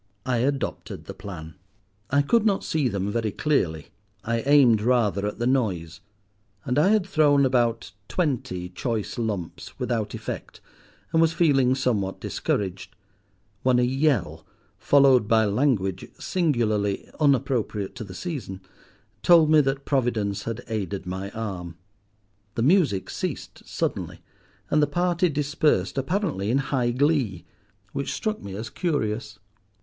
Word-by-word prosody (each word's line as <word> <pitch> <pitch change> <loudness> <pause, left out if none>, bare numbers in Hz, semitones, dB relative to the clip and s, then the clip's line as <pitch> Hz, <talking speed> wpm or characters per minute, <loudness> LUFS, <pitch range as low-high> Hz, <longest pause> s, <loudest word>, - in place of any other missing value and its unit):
I 125 -2 +1
adopted 135 +3 -2
the - - -7
plan. 80 -5 -8 0.6
I 140 +1 +3
could 230 +10 +3
not 205 -3 +1
see 155 -4 0
them 100 -3 -2
very 115 0 -1
clearly. 85 - 0 0.3
I 115 +1 0
aimed 130 -7 +6
rather 105 -5 +2
at 105 - -5
the 120 - -2
noise; 95 -11 0 0.7
and 125 +3 +1
I 155 - +4
had 210 -2 +3
thrown 145 -6 +4
about 120 -4 +1 0.2
twenty 130 - -2
choice 110 +5 -3
lumps 105 -7 -4
without 110 -4 -2
effect, - - -7 0.5
and 160 - +4
was 165 0 +3
feeling 135 -7 +3
somewhat 105 -8 -1
discouraged, 100 +3 -3 0.7
when 125 -1 +3
a 125 - +3
yell, 135 - 0 0.4
followed 135 -5 +5
by 110 0 +4
language 100 -5 0
singularly 110 - 0
unappropriate 125 -8 +1
to - - -5
the 95 -3 -10
season, 125 - -5 0.6
told 165 -3 +6
me 155 -1 +7
that 135 0 -2
Providence 110 -7 0
had 115 +1 -4
aided 100 -4 -3
my 95 +2 -4
arm. 95 -7 -6 0.8
The 115 - 0
music 140 - +2
ceased - - -5
suddenly, - - -3 0.5
and 150 - +4
the 150 - +3
party 175 +3 +1
dispersed, 145 - +1
apparently 145 - -1
in 125 - +2
high 135 -3 0
glee—which 120 - -2
struck 215 -1 -2
me 100 -1 -7
as 110 +2 -6
curious. 110 - -2
120 Hz, 135 wpm, -25 LUFS, 100-145 Hz, 0.8 s, me